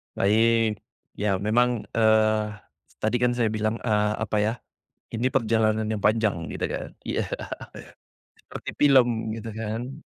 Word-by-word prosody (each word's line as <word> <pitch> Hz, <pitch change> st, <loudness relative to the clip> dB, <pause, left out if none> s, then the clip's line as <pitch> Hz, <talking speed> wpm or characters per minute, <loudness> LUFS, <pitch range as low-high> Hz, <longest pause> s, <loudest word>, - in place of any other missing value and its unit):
Baik, 110 Hz, +1 st, +3 dB, 0.4 s
ya 105 Hz, -1 st, +1 dB
memang, 115 Hz, +4 st, +1 dB
eee, 110 Hz, -1 st, +3 dB, 0.6 s
tadi 115 Hz, +3 st, +1 dB
kan 120 Hz, 0 st, +2 dB
saya 115 Hz, -3 st, +1 dB
bilang, 110 Hz, 0 st, -1 dB
eee, 105 Hz, -2 st, +2 dB
apa 105 Hz, 0 st, -1 dB
ya, 105 Hz, +2 st, +1 dB, 0.6 s
ini 115 Hz, +2 st, -3 dB
perjalanan 110 Hz, -3 st, +1 dB
yang 110 Hz, -, -1 dB
panjang 105 Hz, -6 st, +2 dB
gitu -, -, -2 dB
kan, -, -, -5 dB
iya, -, -, -2 dB, 1.1 s
seperti -, -, -9 dB
film 120 Hz, -6 st, +3 dB
gitu 115 Hz, 0 st, -6 dB
kan. 115 Hz, +6 st, -5 dB
110 Hz, 130 wpm, -25 LUFS, 105-115 Hz, 1.1 s, Baik